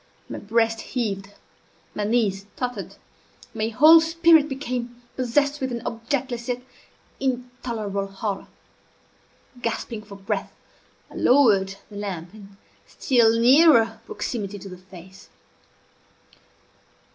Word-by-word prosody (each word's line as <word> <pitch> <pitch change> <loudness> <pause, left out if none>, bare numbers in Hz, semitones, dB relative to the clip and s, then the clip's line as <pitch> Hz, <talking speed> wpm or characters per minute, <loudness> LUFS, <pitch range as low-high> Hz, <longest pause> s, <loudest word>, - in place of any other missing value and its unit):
My - - -6
breast 225 +1 +1
heaved, 200 -6 -3 0.6
my 210 - -2
knees 205 -3 0
tottered, 250 -1 -4 0.6
my 220 -1 -1
whole 310 +9 +7
spirit 325 -2 +4
became 245 -3 -4 0.2
possessed 280 +3 0
with 260 -1 -2
an 235 -1 -4
objectless 240 +1 -3
yet 250 0 -3 0.6
intolerable 245 -6 -3
horror. 195 +1 -4 1.1
Gasping 230 -1 -3
for 205 -1 -12
breath, 195 0 -3 0.6
I - - -13
lowered 205 -8 +4 0.2
the 205 - -8
lamp 185 -4 -5
in 200 -2 -14 0.3
still 230 -4 +3
nearer 235 -4 +5
proximity 205 -4 -4
to 195 0 -10
the 180 -1 -10
face. 185 0 -15
230 Hz, 110 wpm, -24 LUFS, 200-255 Hz, 1.1 s, whole